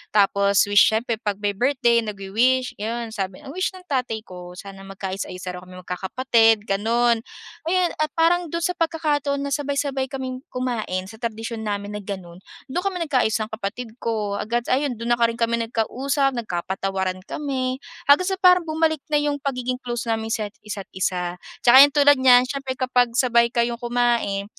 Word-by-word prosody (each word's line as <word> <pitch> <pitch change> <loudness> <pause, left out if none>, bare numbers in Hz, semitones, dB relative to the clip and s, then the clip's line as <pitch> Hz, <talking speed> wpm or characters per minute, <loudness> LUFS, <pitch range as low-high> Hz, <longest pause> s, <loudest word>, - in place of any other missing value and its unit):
Tapos 200 -1 +4
wish 205 +1 +6
siyempre 225 0 -1
'pag 205 -3 -2
may 205 - +2
birthday 240 +2 +2
nagwi-wish 225 +5 0
yun 230 +1 -3
sabi. 195 +1 -5
Ang 275 - -8
wish 370 +5 -1
ng 370 - -12
tatay 250 -5 -2
ko 180 -2 -10
sana 195 +1 -10
magkaayos-ayos 190 -1 -6
daw 180 -1 -5
kaming 185 0 -12
magkakapatid, 225 +4 +2
gano'n. 230 +3 +1 0.5
Ayun, 360 0 +2
at 310 - +1
parang 340 +1 +3
do'n 335 +2 -3
sa 360 - +2
pagkakataon 295 -4 0
na 280 - -4
sabay-sabay 280 -1 -1
kaming 260 -1 -5
kumain 235 -7 -3
sa 220 0 -13
tradisyon 225 -1 -4
namin 205 0 -3
na - - -7
gano'n, 180 -4 -7 0.3
do'n 355 +7 -2
kami 385 -2 -1
nagkaayos 255 -6 +2
ng 215 - -4
kapatid 220 +2 -5
ko, 210 -3 -2
agad 235 +3 -1
ayun 270 0 +1
do'n 230 +1 -5
na 240 - +4
rin 230 - 0
kami 230 0 +1
nagka-usap 270 +5 0
nagkapatawaran 190 -2 -2
kami. 265 -3 -3 0.3
Hanggang 295 +6 +5
sa 380 - -1
parang 360 -1 +6
bumalik 315 -1 +1
na 300 - +3
yung 290 -1 -1
pagiging 255 -2 -2
close 240 -1 -4
namin 225 -1 -1
sa 220 -1 -1 0.2
isa't 205 -2 -6
isa. 180 -1 -2 0.3
Tsaka 255 +2 +9
ayan 285 - +8
tulad 290 0 +6
niyan 250 -1 +7
siyempre 265 -1 -4
kapag 250 -1 +2
sabay 235 -2 +4
kayong 235 0 0
kumain 235 -5 0
235 Hz, 175 wpm, -23 LUFS, 205-275 Hz, 0.5 s, Tsaka